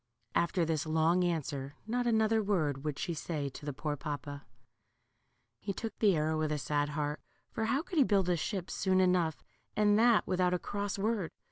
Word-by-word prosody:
After 170 0 +2
this 160 -1 -1
long 160 +3 +3
answer, 145 -5 -2
not 245 +2 -1
another 220 -1 +3
word 155 -10 0
would 150 -2 -2
she 180 -2 -2
say 155 -3 -3
to 145 +2 -10
the - - 0
poor 145 +2 -3
papa. 145 -1 -6 1.1
He 200 - -3
took 225 +3 -5
the 205 -5 +4
arrow 155 0 0
with 155 -1 0
a 150 - 0
sad 145 +1 0
heart, 150 0 -2 0.3
for 220 - -2
how 270 +7 +1
could 350 -2 -2
he - - +8
build 200 -6 +2
a 180 - +3
ship 180 +2 -3
soon 185 -1 +1
enough, 180 -4 +2 0.3
and 210 0 +4
that 235 -1 +5
without 180 -1 +1
a - - +1
cross 205 +2 -3
word 205 -3 0
175 Hz, 195 wpm, -32 LUFS, 150-205 Hz, 1.1 s, he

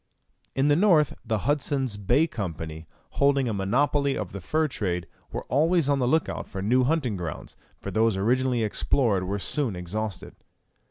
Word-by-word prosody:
In 135 +2 +2
the 145 - +5
north 165 -5 +4
the 110 -4 -2
Hudson's 140 -4 0
Bay 105 +10 +2
Company, 80 - -6 0.3
holding 140 -2 +3
a 115 - -1
monopoly 140 +8 +1
of 100 - -4
the 100 - -7
fur 155 - +1
trade, 90 - -2 0.3
were - - -4
always 160 +3 +2
on 140 -1 +2
the 125 - +1
look 160 +5 +2
out - - -5
for 95 - -7
new 125 +5 +3
hunting 135 -5 0
grounds, 85 -4 -6 0.2
for - - -6
those 110 -2 +2
originally 125 +3 +1
explored 105 -2 +1
were 100 +2 -2
soon 120 +1 -1
exhausted. 100 +4 -5
120 Hz, 170 wpm, -26 LUFS, 100-140 Hz, 0.3 s, the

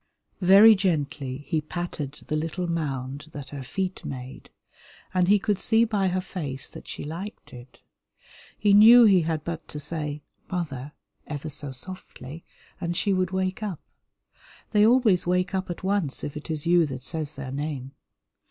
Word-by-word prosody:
Very 200 +5 +9
gently 145 -7 -2
he 160 -3 0
patted 150 -3 -5
the 155 - -2
little 165 +3 -2
mound 145 -4 -3
that 140 -2 -7
her 140 -1 -7
feet 185 +8 -3
made, 130 -1 -8 0.6
and 180 -1 +3
he 205 +2 +6
could 205 -1 0
see 225 +3 +4
by 205 -4 0
her 185 0 0
face 145 -8 -4
that - - -11
she - - -6
liked 175 +8 -7
it. 125 +1 -13 0.8
He 205 -1 +3
knew 230 +4 +9
he 195 -5 +6
had 160 -2 -2
but 165 -2 -5
to 150 - -7
say 150 -1 -4 0.3
"Mother" 150 -6 -4 0.3
ever 150 +1 -5
so 145 -1 -5
softly, 160 0 -8 0.4
and 170 -1 -2
she 200 - +1
would 185 -1 +1
wake 190 +1 -2
up. 200 -7 -4 0.9
They 210 -1 +5
always 225 -8 +4
wake 180 +2 +1
up 190 -1 -2
at 175 - -6
once 190 -7 0
if 145 - -5
it 150 - -8
is 155 -1 -3
you 170 -1 +4
that 130 -2 -6
says 155 0 -3
their 135 -2 -6
name. 140 -2 -4
165 Hz, 170 wpm, -26 LUFS, 145-190 Hz, 0.9 s, Very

